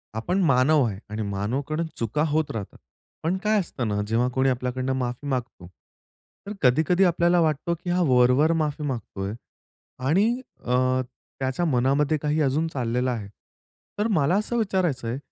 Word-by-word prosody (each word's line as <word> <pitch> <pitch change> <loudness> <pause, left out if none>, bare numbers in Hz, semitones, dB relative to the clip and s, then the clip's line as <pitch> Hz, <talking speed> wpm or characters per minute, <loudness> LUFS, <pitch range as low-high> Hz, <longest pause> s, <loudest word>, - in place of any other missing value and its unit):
आपण 180 +13 0
मानव 140 +1 +4
आहे. 100 - -4
आणि 105 +1 -4
मानवकडून 130 +11 -2
चुका 120 +7 -1
होत 155 0 0
राहतात. 105 -4 -6 0.5
पण 170 +4 0
काय 215 0 +3
असतं 140 - -3
ना, 105 -1 -1
जेव्हा 115 +3 +1
कोणी 130 +1 +2
आपल्याकडून 125 +1 -2
माफी 125 +2 -3
मागतो. 125 -9 -4 0.8
तर 205 - -4
कधी-कधी 160 +8 +3
आपल्याला 175 0 +3
वाटतो, 160 +1 0
की 180 - -4
हा 180 +1 +2
वर-वर 125 +5 +4
माफी 150 0 -3
मागतोय, 105 -7 -4 0.7
आणि 185 +9 +4 0.4
अ, 130 +1 +2 0.4
त्याच्या 135 +6 -1
मनामध्ये 140 +2 +2
काही 150 +1 0
अजून 150 +3 +1
चाललेलं 125 -3 -1
आहे. 110 -5 -4 0.7
तर 210 - +2
मला 155 -2 +2
असं 215 +3 -1
विचारायचंय, 170 - 0
135 Hz, 150 wpm, -25 LUFS, 125-160 Hz, 0.8 s, मानव